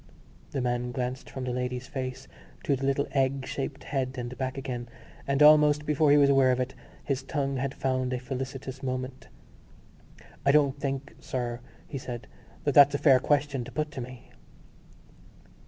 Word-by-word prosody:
The 135 - -2
man 125 0 -1
glanced 125 +1 -4
from 130 - -6
the 125 - -2
lady's 125 0 -3
face 130 0 -5 0.4
to 140 - +2
the 135 +1 -2
little 140 +1 +1
egg 135 -1 +1
shaped 140 0 -4
head 135 -2 -2
and 120 0 -4
back 130 0 -3
again; 125 -3 -4 0.4
and, 140 +1 +3
almost 150 -1 +6
before 150 0 +3
he 145 - +7
was 140 -1 +6
aware 135 -2 +5
of 125 - +1
it, 130 0 -2 0.3
his 135 -2 -1
tongue 140 -1 -2
had 135 +1 -2
found 130 -1 0
a 125 - 0
felicitous 130 +1 -5
moment: 130 0 -4 1.2
"I 140 - +5
don't 140 -1 +3
think, 135 0 -3
sir," 120 -2 -3 0.3
he 135 - -5
said, 125 -1 -6 0.4
"that 145 - +1
that's 145 0 +7
a - - +2
fair 135 -3 +6
question 140 -2 +1
to 130 - -9
put 150 +3 -2
to 130 - -5
me." 125 0 -10
135 Hz, 175 wpm, -28 LUFS, 125-140 Hz, 1.2 s, he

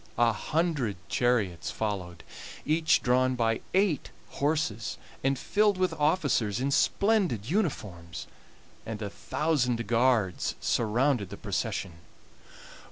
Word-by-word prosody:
A 120 -1 +4
hundred 150 - -1
chariots 110 -9 +1
followed, 95 -5 -4 0.4
each 160 +2 +3
drawn 130 +1 +3
by 115 -2 +1
eight 190 -6 +2 0.2
horses, 130 -8 -1 0.3
and 135 0 +2
filled 205 +7 +2
with 185 0 +1
officers 145 - +1
in 135 +2 0
splendid 185 - +2
uniforms, 95 - -2 0.6
and 110 -1 -5
a 100 - -4
thousand 125 -7 0
guards 115 -4 +2
surrounded 120 -1 +1
the 100 - -8
procession. 100 -4 -3
120 Hz, 105 wpm, -28 LUFS, 105-155 Hz, 0.6 s, A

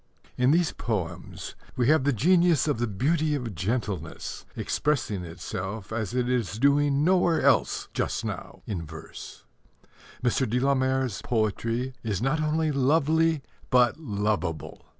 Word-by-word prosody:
In 125 +1 +3
these 170 +2 +3
poems 90 -7 -4 0.2
we 120 -2 +1
have 155 -3 +4
the 145 - +4
genius 170 - +3
of 145 -6 0
the 120 - +1
beauty 150 - +1
of 120 -6 -4
gentleness 95 -2 -3
expressing 120 -10 -1
itself 95 +5 -6
as 110 +1 -2
it 125 -1 +1
is 120 -5 -1
doing 140 +2 +3
nowhere 175 -1 +3
else - - +2
just - - -1
now - - -6
in 90 -6 -3
verse. 80 0 -10 0.8
Mr. 125 0 +1
de 125 +3 +1
la 140 +2 +3
Mare's 130 -3 0
poetry 115 +3 -1
is 105 -5 -2
not 135 +6 0
only 155 0 +1
lovely, 155 +2 +2 0.3
but 125 +3 +4
lovable. 105 - -2
125 Hz, 140 wpm, -27 LUFS, 105-150 Hz, 0.8 s, have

